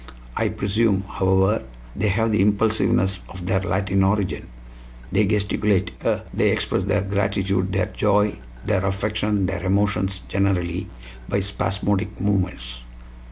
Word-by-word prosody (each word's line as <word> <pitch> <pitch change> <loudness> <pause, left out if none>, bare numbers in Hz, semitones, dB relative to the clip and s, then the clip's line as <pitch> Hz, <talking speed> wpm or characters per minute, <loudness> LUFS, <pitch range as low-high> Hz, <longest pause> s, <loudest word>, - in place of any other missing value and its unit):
I - - +1
presume, 100 -1 +1
however, 95 +3 +2 0.3
they 105 - 0
have 110 +3 +1
the 105 - +2
impulsiveness 100 -2 +2
of 90 -1 -8
their 95 +1 +2
Latin 95 0 +1
origin. 100 0 0 0.6
They 105 +1 +3
gesticulate 100 -1 +1
eh? - - +1
They - - +2
express - - 0
their - - +1
gratitude, 100 -1 0
their - - +1
joy, 105 0 +1 0.3
their 100 -3 +1
affection, 105 +1 0
their 95 -1 -3
emotions 95 0 +1
generally, 95 -3 0 0.4
by 100 - +1
spasmodic 100 +1 -1
movements? 90 -12 -1
100 Hz, 125 wpm, -23 LUFS, 95-105 Hz, 0.6 s, They